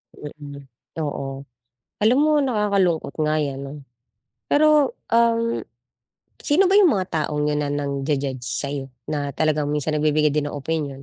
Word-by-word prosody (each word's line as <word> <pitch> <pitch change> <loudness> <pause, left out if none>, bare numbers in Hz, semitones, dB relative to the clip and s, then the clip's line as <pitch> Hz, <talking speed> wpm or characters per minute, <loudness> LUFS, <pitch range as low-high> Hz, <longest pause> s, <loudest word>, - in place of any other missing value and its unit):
Mm, 145 -1 -9 0.4
oo. 135 -2 -4 0.6
Alam 230 +6 +4
mo 310 - +3
nakakalungkot 200 - +1
nga 155 0 +1
yan 140 -2 -3
'no. 135 - -8 0.8
Pero, 300 -2 +4 0.2
um, 230 0 +2 0.8
sino 350 +6 +3
ba 390 - +3
yung 370 -6 +6
mga 185 -2 -1 0.2
taong 150 -1 -2
yun 150 0 0
na 145 - -2
nang-ju-judge 140 -2 -2
sayo, 135 +3 -3 0.2
na 145 -2 -2
talagang 150 0 0
minsan 150 +1 -1
nagbibigay 150 0 +2
din 145 0 -1
ng - - -8
opinyon? 140 -2 -3
150 Hz, 140 wpm, -22 LUFS, 140-210 Hz, 0.8 s, yung